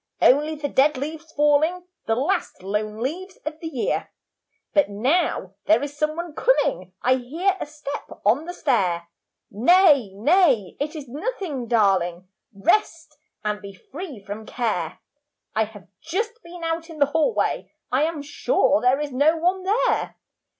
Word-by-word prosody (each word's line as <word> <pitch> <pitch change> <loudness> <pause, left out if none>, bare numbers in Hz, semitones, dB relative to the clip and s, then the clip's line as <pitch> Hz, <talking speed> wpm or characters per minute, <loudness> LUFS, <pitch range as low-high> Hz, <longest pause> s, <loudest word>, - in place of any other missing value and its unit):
Only 300 +4 +4
the 295 -1 -3
dead 285 +1 +3
leaves 315 +3 -6
falling; 300 +4 +2 0.2
The 225 - +2
last 310 - -1
lone 210 +2 -2
leaves 370 +8 -4
of 310 +1 -5
the 325 - -5
year. 270 -7 -2 0.6
'But 295 -7 +4
now 240 - 0
there 220 +5 +4
is 290 0 -5
some 305 +1 0
one 340 -1 -5
coming, 185 - +1
I 255 +1 +4
hear 330 +10 0
a - - -4
step 290 -1 -7 0.2
on 245 +10 +3
the 355 - -5
stair.' 180 - 0 0.4
Nay, 290 - +5
nay, 260 - +3
it 300 +3 -3
is 295 -3 -7
nothing, 300 - -4
darling, 185 -6 +2 0.2
Rest, 320 - 0 0.3
and 210 0 -1
be 200 -1 -9
free 290 - -8
from 215 +2 -7
care. 195 -9 -2 0.6
I 220 0 +2
have 205 -4 -14
just 435 +9 -3
been 340 0 -10
out 330 0 -2
in 325 - -9
the 285 - +5
hallway, 320 +9 +1 0.2
I 260 +3 +2
am 315 -3 -3
sure 290 +1 +2
there 255 +3 +3
is 295 -1 -3
no 290 +6 +3
one 360 +3 +1
there. 440 +7 +1
290 Hz, 155 wpm, -23 LUFS, 225-330 Hz, 0.6 s, Nay